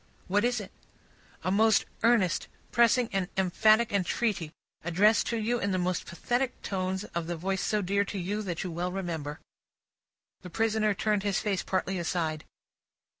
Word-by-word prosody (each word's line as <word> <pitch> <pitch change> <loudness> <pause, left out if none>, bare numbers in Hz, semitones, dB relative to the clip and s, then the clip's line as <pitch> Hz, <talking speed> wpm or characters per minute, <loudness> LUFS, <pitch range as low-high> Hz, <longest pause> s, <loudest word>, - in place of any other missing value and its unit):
"What 205 +3 +2
is 245 -1 +1
it?" 205 - -8 0.7
"A 185 - 0
most 220 +2 +4 0.2
earnest, 225 -6 +3 0.2
pressing, 235 +1 +4
and 190 -2 0
emphatic 215 +4 +3
entreaty, 195 -3 0 0.3
addressed 195 +7 +3
to 235 - -1
you 235 +2 0
in 200 - -1
the 185 - 0
most 180 0 -1
pathetic 245 +8 -1
tones 190 0 -2
of 170 -1 -2
the 175 - -2
voice 190 +3 -1
so 210 -1 0
dear 200 +2 +2
to 200 - -5
you, 195 +4 -2
that 180 -5 -3
you 185 - -4
well 175 +2 -2
remember." 165 -5 -4 1.0
The 180 - -9
prisoner 215 +1 +1
turned 210 +2 +1
his 200 -1 0
face 200 -3 -1
partly 190 0 -1
aside. 160 -3 -2
195 Hz, 165 wpm, -29 LUFS, 180-215 Hz, 1.0 s, most